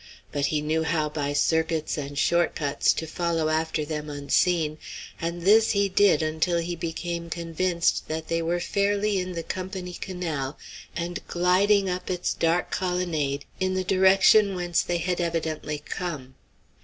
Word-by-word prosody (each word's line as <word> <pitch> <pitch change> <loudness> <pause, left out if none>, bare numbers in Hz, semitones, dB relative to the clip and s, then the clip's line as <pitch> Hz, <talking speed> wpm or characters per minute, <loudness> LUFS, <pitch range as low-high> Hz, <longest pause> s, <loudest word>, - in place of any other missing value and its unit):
But 145 -1 0
he 150 0 0
knew 155 +2 0
how 160 -1 0
by 145 -1 -2
circuits 160 +1 +1
and 145 -1 -5
short 170 +3 +2
cuts 145 -2 +1
to 160 - -4
follow 165 -1 -1
after 160 -1 0
them 150 0 -4
unseen, 155 +2 +1 0.4
and 170 +1 -3
this 220 +4 +5
he 200 -1 +2
did 185 -5 +4
until 160 +3 0
he 170 +1 -2
became 170 0 -4
convinced 170 +1 0
that 160 0 -4
they 165 +1 0
were 170 +2 0
fairly 200 +2 +1
in 180 0 -4
the 165 -1 -4
Company 185 0 -5
Canal 165 -8 -4 0.4
and 175 +1 -3
gliding 195 +3 +3
up 180 0 -3
its 180 -1 -1
dark 165 +2 0
colonnade 165 -6 -1
in 185 0 0
the 185 - 0
direction 195 +2 +5
whence 175 -2 +1
they 175 - -1
had 175 +1 -1
evidently 160 -3 -2
come. 150 -4 -6
170 Hz, 155 wpm, -26 LUFS, 155-180 Hz, 0.4 s, this